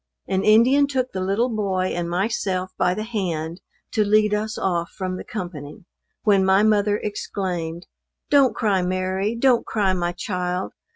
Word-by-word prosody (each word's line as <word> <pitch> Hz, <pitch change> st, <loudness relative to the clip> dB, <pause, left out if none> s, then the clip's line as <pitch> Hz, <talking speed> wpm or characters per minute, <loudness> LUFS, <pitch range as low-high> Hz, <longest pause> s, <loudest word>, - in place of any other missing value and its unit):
An 190 Hz, 0 st, 0 dB
Indian 250 Hz, +7 st, +5 dB
took 260 Hz, -2 st, -1 dB
the 190 Hz, -, -4 dB
little 220 Hz, +6 st, 0 dB
boy 190 Hz, -3 st, 0 dB
and 175 Hz, -1 st, -2 dB
myself 185 Hz, 0 st, -1 dB
by 180 Hz, -, +1 dB
the 215 Hz, -, -3 dB
hand, 175 Hz, -6 st, -3 dB, 0.3 s
to 215 Hz, -, +2 dB
lead 210 Hz, 0 st, +3 dB
us 215 Hz, +1 st, -2 dB
off 170 Hz, -2 st, -1 dB
from 185 Hz, -1 st, -4 dB
the -, -, -6 dB
company, 175 Hz, -2 st, -7 dB, 0.4 s
when 200 Hz, -3 st, +4 dB
my 190 Hz, +2 st, +4 dB
mother 210 Hz, -1 st, +3 dB
exclaimed, 180 Hz, -5 st, -4 dB, 0.5 s
"Don't 275 Hz, -6 st, +5 dB
cry 205 Hz, -5 st, +1 dB
Mary 185 Hz, +4 st, -1 dB
don't 245 Hz, 0 st, +3 dB
cry 200 Hz, -4 st, 0 dB
my 175 Hz, -1 st, -1 dB
child. 180 Hz, -1 st, -3 dB
195 Hz, 160 wpm, -23 LUFS, 180-215 Hz, 0.5 s, Indian